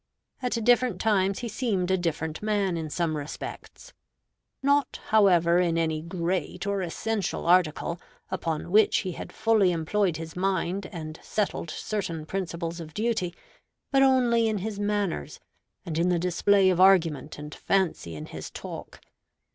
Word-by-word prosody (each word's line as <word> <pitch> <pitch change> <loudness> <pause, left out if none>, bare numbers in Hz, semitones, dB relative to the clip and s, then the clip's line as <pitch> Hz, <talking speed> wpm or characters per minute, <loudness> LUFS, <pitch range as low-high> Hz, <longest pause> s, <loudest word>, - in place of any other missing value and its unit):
At 250 -1 -1
different 245 -4 +3
times 195 -3 +2
he 240 - -3
seemed 210 -5 -1
a - - +4
different 160 -3 -2
man 205 -4 0
in 160 -2 -4
some 165 0 -1
respects; 150 +1 -8 0.7
not, 285 +1 +2
however, 175 -5 +5
in 170 -2 +1
any 160 -2 0
great 180 +2 -2
or 200 -1 0
essential 200 +3 -2
article, 170 -1 +2 0.3
upon 165 -3 -3
which 215 +1 +5
he 185 - -3
had - - -8
fully 220 -4 +3
employed 175 +1 0
his 165 0 -8
mind 190 0 -1
and 155 -3 -7
settled 205 -5 -2
certain 165 -3 -3
principles 170 -1 -4
of 155 -2 -9
duty, 215 -6 -1 0.6
but 270 -1 +4
only 245 -4 +4
in 215 -1 0
his 205 +1 -4
manners, 205 - -2 0.5
and 165 -2 -2
in 175 +2 +2
the 175 - +2
display 185 +3 +3
of 180 0 +1
argument 165 -6 +4
and 150 +1 -8
fancy 180 - 0
in 75 - -7
his - - -8
talk. - - -8
185 Hz, 150 wpm, -27 LUFS, 165-205 Hz, 0.7 s, however